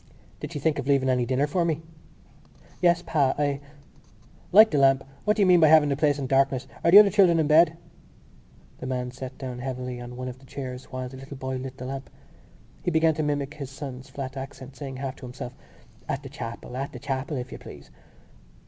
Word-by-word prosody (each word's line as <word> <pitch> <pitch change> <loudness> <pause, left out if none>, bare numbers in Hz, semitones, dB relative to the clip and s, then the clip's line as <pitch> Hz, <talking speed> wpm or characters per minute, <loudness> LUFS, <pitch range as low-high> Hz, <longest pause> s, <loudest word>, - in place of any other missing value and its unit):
Did - - -6
she - - -5
think 150 +1 0
of 135 - -4
leaving 135 -2 +3
any 125 -2 +1
dinner 130 +3 +2
for 170 +4 0
me?" 160 -1 -1 1.0
"Yes, 175 -1 +3
pa. 140 -4 +2
I——" 145 -1 0 0.9
"Light 215 +4 +8
the 150 - +2
lamp. 135 0 +4 0.2
What 210 - +3
do 205 - +4
you - - +5
mean 180 -1 +6
by 160 - +6
having 155 -1 +6
the 140 - +1
place 145 0 +2
in 140 - -3
darkness? 135 0 +2 0.2
Are - - +4
the 185 - +9
other 205 -1 +9
children 180 -4 +5
in 160 - +3
bed?" 160 +2 +5 1.0
The 130 - -6
man 125 -1 -2
sat 130 +1 -8
down 125 -2 -6
heavily 125 -1 -5
on 120 0 -8
one 125 +1 -5
of 125 0 -7
the 135 - -18
chairs 130 -1 -6
while 130 -1 -5
the 130 +1 -10
little 135 +1 -9
boy 130 -1 -3
lit 130 0 -7
the 125 - -7
lamp. 135 +1 -6 0.7
He - - -1
began 160 -1 +3
to 155 - -2
mimic 145 -1 -1
his 140 -3 -7
son's 135 -1 -8
flat 135 -1 -6
accent, 135 0 -8
saying 135 0 -7
half 135 0 -5
to 130 - -10
himself: 125 0 -7 0.6
_"At - - -2
the - - -8
chapel. 115 +2 -7
At 135 +2 -4
the - - -6
chapel, 135 +1 -3
if 125 0 -6
you - - -8
please!" - - -12
135 Hz, 220 wpm, -26 LUFS, 130-150 Hz, 1.0 s, the